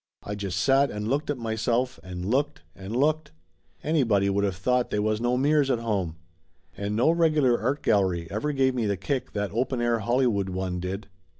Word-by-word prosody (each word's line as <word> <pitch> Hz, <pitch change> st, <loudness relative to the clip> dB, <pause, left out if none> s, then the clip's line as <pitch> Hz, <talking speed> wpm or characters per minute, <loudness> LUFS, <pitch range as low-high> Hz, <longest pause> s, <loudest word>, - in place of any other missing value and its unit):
I 105 Hz, -, -5 dB
just 100 Hz, -3 st, -3 dB
sat 135 Hz, +8 st, +4 dB
and 105 Hz, 0 st, -4 dB
looked 140 Hz, +6 st, -1 dB
at 145 Hz, -, 0 dB
myself 115 Hz, +2 st, -1 dB
and 90 Hz, -1 st, -6 dB
looked 130 Hz, -, 0 dB
and 95 Hz, +4 st, -6 dB
looked. 150 Hz, -, +1 dB, 0.5 s
Anybody 115 Hz, -11 st, +2 dB
would 100 Hz, +1 st, +1 dB
of 100 Hz, -2 st, 0 dB
thought 125 Hz, +6 st, +1 dB
they -, -, -1 dB
was 110 Hz, +1 st, 0 dB
no 120 Hz, +1 st, +1 dB
mirrors 145 Hz, +1 st, +3 dB
at 125 Hz, -, +2 dB
home. 100 Hz, -8 st, -2 dB, 0.6 s
And 100 Hz, +1 st, -3 dB
no 125 Hz, +8 st, +4 dB
regular 155 Hz, -7 st, +3 dB
art 135 Hz, +6 st, -1 dB
gallery 95 Hz, -5 st, +2 dB
ever 110 Hz, +9 st, -1 dB
gave 135 Hz, -2 st, +2 dB
me 120 Hz, -4 st, -1 dB
the 100 Hz, -1 st, 0 dB
kick 125 Hz, +8 st, -3 dB
that 105 Hz, -1 st, -2 dB
open 125 Hz, +3 st, -1 dB
air 120 Hz, -1 st, +1 dB
Hollywood 115 Hz, -3 st, +1 dB
one 90 Hz, -1 st, -3 dB
did. 95 Hz, +3 st, -4 dB
115 Hz, 195 wpm, -26 LUFS, 100-130 Hz, 0.6 s, sat